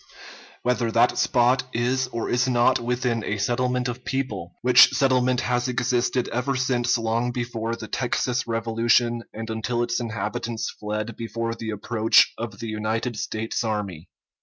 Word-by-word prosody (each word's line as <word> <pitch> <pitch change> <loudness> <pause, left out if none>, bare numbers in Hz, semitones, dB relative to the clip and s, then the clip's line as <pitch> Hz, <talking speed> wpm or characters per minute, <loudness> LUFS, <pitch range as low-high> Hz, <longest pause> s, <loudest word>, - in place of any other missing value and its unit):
_ - - -25 0.6
Whether 120 -2 +1
that 120 +2 +4
spot 125 +1 +3
is 125 +3 0
or 115 -2 -4
is 125 +2 +1
not 120 -2 +3
within 120 -1 -1
a 105 - -2
settlement 125 +4 0
of 125 +1 -5
people, 110 -11 -3
which 125 0 +8
settlement 130 -2 +2
has 125 +1 0
existed 125 0 0
ever 125 +3 -1
since 125 -2 +1
long 115 +2 0
before 120 -2 -3
the 110 -2 -8
Texas 125 +1 -1
revolution 115 +1 +1
and 115 +1 -6
until 120 +2 -1
its 120 0 -1
inhabitants 115 0 -3
fled 105 +2 -4
before 115 0 -3
the 115 -1 -6
approach 110 +1 +3
of 110 -3 -6
the 115 - -6
United 110 +2 -2
States 110 +2 -3
army. 100 -6 -4
120 Hz, 155 wpm, -24 LUFS, 110-125 Hz, 0.6 s, which